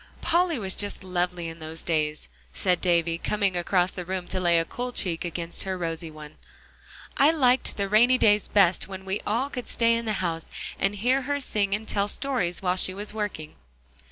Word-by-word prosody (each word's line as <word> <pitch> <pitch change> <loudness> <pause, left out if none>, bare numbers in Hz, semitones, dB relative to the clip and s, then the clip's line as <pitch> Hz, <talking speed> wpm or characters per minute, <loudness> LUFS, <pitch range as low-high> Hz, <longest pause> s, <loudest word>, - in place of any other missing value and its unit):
"Polly 340 -2 +2
was 190 -4 -1
just 205 -1 -4
lovely 180 -2 -2
in 165 0 -8
those 160 +1 -7
days," 155 -2 -1 0.3
said 180 -3 +1
Davie, 170 -2 +2
coming 200 -2 0
across 180 +1 +1
the 180 - -5
room 185 0 -4
to - - 0
lay 175 -2 +4
a 165 - +2
cool 245 +8 -5
cheek 175 -8 0
against 170 0 -4
her 190 -1 -2
rosy 165 -1 -4
one. 155 -1 -12 0.8
"I 280 - +6
liked 260 -5 +2
the 200 -1 -1
rainy 235 +5 +5
days 210 -3 +4
best 190 -3 +3
when 190 0 -8
we 190 +2 -2
all 245 +7 0
could 250 -2 -5
stay 230 -1 +2
in 230 0 -1
the 215 - 0
house, 170 -4 -2 0.3
and 195 +1 +1
hear 250 +6 +2
her 285 0 +1
sing 205 -7 0
and 220 +1 -7
tell 200 0 +1
stories 205 -7 -1
while 180 0 +1
she 185 0 +1
was 205 +1 -6
working." 205 -8 -5
190 Hz, 200 wpm, -26 LUFS, 175-220 Hz, 0.8 s, I